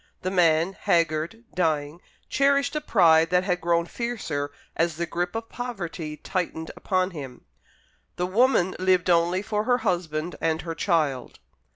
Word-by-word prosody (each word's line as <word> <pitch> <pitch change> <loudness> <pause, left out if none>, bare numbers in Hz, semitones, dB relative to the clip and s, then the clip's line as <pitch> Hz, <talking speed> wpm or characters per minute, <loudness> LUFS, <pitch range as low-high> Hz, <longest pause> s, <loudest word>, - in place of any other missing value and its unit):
The 185 - -1
man 170 0 +3
haggard, 170 +3 0
dying 155 -2 -1 0.3
cherished 280 +1 +2
a 300 - 0
pride 165 - +4
that 180 +1 +3
had 180 -2 -1
grown 170 0 +2
fiercer 170 -11 -3 0.3
as 165 -1 +1
the 170 +2 -2
grip 175 +2 -3
of 225 0 -4
poverty 175 -12 -5
tightened 160 -1 -3
upon 185 0 0
him. 135 -7 -9 0.7
The 180 - -1
woman 190 -1 +2
lived 185 -1 +3
only 175 +3 +2
for 210 0 -1
her 245 0 +3
husband 170 -5 -2
and 160 0 0
her 165 -1 -4
child. 155 -8 0
175 Hz, 150 wpm, -25 LUFS, 160-195 Hz, 0.7 s, pride